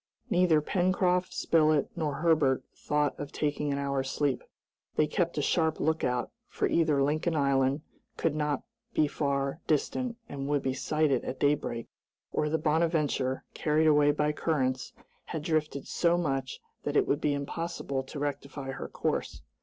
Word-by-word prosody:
Neither 175 Hz, -4 st, +4 dB
Pencroft, 180 Hz, +1 st, +1 dB
Spilett, 155 Hz, -3 st, +2 dB
nor 155 Hz, -4 st, -1 dB
Herbert 150 Hz, -5 st, +3 dB
thought 150 Hz, 0 st, 0 dB
of 145 Hz, 0 st, -5 dB
taking 150 Hz, -1 st, -1 dB
an 140 Hz, -, 0 dB
hour's 140 Hz, -1 st, -1 dB
sleep. 140 Hz, -3 st, 0 dB, 0.5 s
They 155 Hz, -, +4 dB
kept 170 Hz, +2 st, -1 dB
a 145 Hz, -, +1 dB
sharp 160 Hz, +1 st, +1 dB
look 160 Hz, +1 st, +1 dB
out, 125 Hz, -1 st, 0 dB, 0.2 s
for -, -, -1 dB
either 155 Hz, -4 st, +3 dB
Lincoln 155 Hz, +4 st, 0 dB
Island 140 Hz, 0 st, +2 dB, 0.4 s
could 165 Hz, -, +1 dB
not 150 Hz, -2 st, -1 dB, 0.3 s
be 155 Hz, -, +4 dB
far 140 Hz, 0 st, -1 dB
distant 230 Hz, -, 0 dB
and 140 Hz, -1 st, -5 dB
would 145 Hz, -2 st, +1 dB
be 130 Hz, -, 0 dB
sighted 145 Hz, -1 st, +1 dB
at 130 Hz, -, -5 dB
daybreak, 140 Hz, -5 st, +1 dB, 0.5 s
or 150 Hz, -, 0 dB
the 160 Hz, -, +1 dB
"Bonadventure," 150 Hz, -4 st, +1 dB
carried 155 Hz, +1 st, +2 dB
away 150 Hz, -1 st, +5 dB
by 150 Hz, +1 st, +2 dB
currents, 130 Hz, -5 st, -1 dB, 0.3 s
had 160 Hz, -2 st, -4 dB
drifted 155 Hz, -3 st, -1 dB
so 170 Hz, 0 st, +2 dB
much 135 Hz, -6 st, -2 dB, 0.2 s
that 145 Hz, 0 st, -1 dB
it -, -, +3 dB
would 145 Hz, -, +1 dB
be 145 Hz, -1 st, +2 dB
impossible 140 Hz, -1 st, -3 dB
to 135 Hz, +3 st, -9 dB
rectify 140 Hz, -1 st, -4 dB
her 135 Hz, -, -5 dB
course. -, -, -2 dB
150 Hz, 160 wpm, -29 LUFS, 140-160 Hz, 0.5 s, away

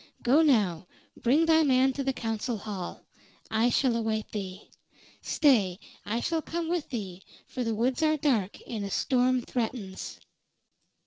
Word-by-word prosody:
Go 270 Hz, +6 st, +5 dB
now, 200 Hz, -, +2 dB, 0.3 s
bring 285 Hz, +7 st, +3 dB
thy 320 Hz, 0 st, +5 dB
man 265 Hz, -2 st, +3 dB
to 275 Hz, -, -3 dB
the 270 Hz, -, +1 dB
council 225 Hz, -1 st, -3 dB
hall. 200 Hz, -4 st, -6 dB, 0.5 s
I 225 Hz, +2 st, +3 dB
shall 245 Hz, 0 st, +2 dB
await 220 Hz, -2 st, -2 dB
thee. 190 Hz, -2 st, -6 dB, 0.5 s
Stay, 210 Hz, -, +3 dB, 0.3 s
I 230 Hz, +3 st, -1 dB
shall 330 Hz, +3 st, 0 dB
come 330 Hz, +1 st, -4 dB
with 345 Hz, -3 st, -1 dB
thee, 195 Hz, -7 st, -5 dB, 0.2 s
for 255 Hz, -, -4 dB
the 225 Hz, -2 st, -1 dB
woods 250 Hz, +6 st, 0 dB
are 310 Hz, 0 st, +3 dB
dark, 245 Hz, -10 st, 0 dB
and 220 Hz, -4 st, -4 dB
a 200 Hz, -, -4 dB
storm 255 Hz, +3 st, +2 dB
threatens." 225 Hz, -6 st, -4 dB
240 Hz, 150 wpm, -28 LUFS, 210-275 Hz, 0.5 s, Go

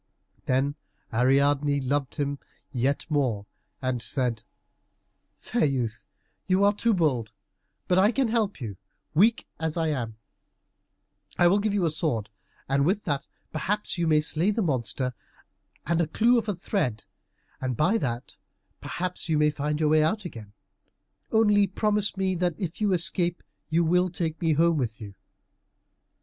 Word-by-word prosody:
Then 135 Hz, +2 st, +2 dB, 0.4 s
Ariadne 140 Hz, +4 st, +3 dB
loved 135 Hz, 0 st, -1 dB
him 140 Hz, -1 st, -2 dB, 0.3 s
yet 135 Hz, +2 st, 0 dB
more, 130 Hz, -10 st, 0 dB, 0.4 s
and 130 Hz, -2 st, -1 dB
said, 120 Hz, -3 st, -1 dB, 1.0 s
"Fair 240 Hz, -, -1 dB
youth, 125 Hz, -6 st, -2 dB, 0.4 s
you 190 Hz, +1 st, +3 dB
are 205 Hz, 0 st, +5 dB
too 225 Hz, +1 st, +1 dB
bold, 130 Hz, -11 st, +1 dB, 0.6 s
but 180 Hz, 0 st, +4 dB
I 205 Hz, +4 st, +5 dB
can 265 Hz, 0 st, +1 dB
help 220 Hz, -5 st, 0 dB
you, 105 Hz, -7 st, -6 dB, 0.4 s
weak 215 Hz, +8 st, +4 dB
as 160 Hz, 0 st, -2 dB
I 165 Hz, -1 st, +1 dB
am. 120 Hz, -7 st, -3 dB, 1.2 s
I 175 Hz, -, +5 dB
will 195 Hz, +4 st, +4 dB
give 205 Hz, 0 st, 0 dB
you 190 Hz, -4 st, +2 dB
a 160 Hz, -, +2 dB
sword, 120 Hz, -10 st, -1 dB, 0.4 s
and 140 Hz, +1 st, +2 dB
with 195 Hz, +7 st, +1 dB
that 140 Hz, -4 st, -2 dB, 0.2 s
perhaps 195 Hz, +4 st, -2 dB
you 170 Hz, -, +1 dB
may 155 Hz, -1 st, +4 dB
slay 160 Hz, +5 st, 0 dB
the 210 Hz, +1 st, +1 dB
monster, 125 Hz, -, -1 dB, 0.7 s
and 170 Hz, +1 st, +1 dB
a 165 Hz, -, +1 dB
clue 235 Hz, +9 st, +3 dB
of 225 Hz, -, -6 dB
thread, 125 Hz, -, -1 dB, 0.6 s
and 130 Hz, -3 st, -2 dB
by 185 Hz, +9 st, +3 dB
that 120 Hz, -, -4 dB, 0.4 s
perhaps 180 Hz, -1 st, -4 dB
you 155 Hz, -, +3 dB
may 150 Hz, 0 st, +4 dB
find 150 Hz, +1 st, -2 dB
your 155 Hz, -1 st, +2 dB
way 155 Hz, 0 st, +5 dB
out 195 Hz, +6 st, 0 dB
again. 110 Hz, -11 st, -8 dB, 0.8 s
Only 210 Hz, -2 st, +4 dB
promise 210 Hz, 0 st, 0 dB
me 190 Hz, -1 st, +1 dB
that 175 Hz, -2 st, 0 dB
if 180 Hz, +1 st, -5 dB
you 210 Hz, -2 st, +2 dB
escape 175 Hz, 0 st, +1 dB, 0.3 s
you 165 Hz, +2 st, +3 dB
will 180 Hz, +3 st, +3 dB
take 165 Hz, -2 st, -3 dB
me 165 Hz, -2 st, +3 dB
home 165 Hz, +2 st, +3 dB
with 115 Hz, -6 st, -2 dB
you." 105 Hz, -3 st, -8 dB
155 Hz, 155 wpm, -26 LUFS, 135-185 Hz, 1.2 s, are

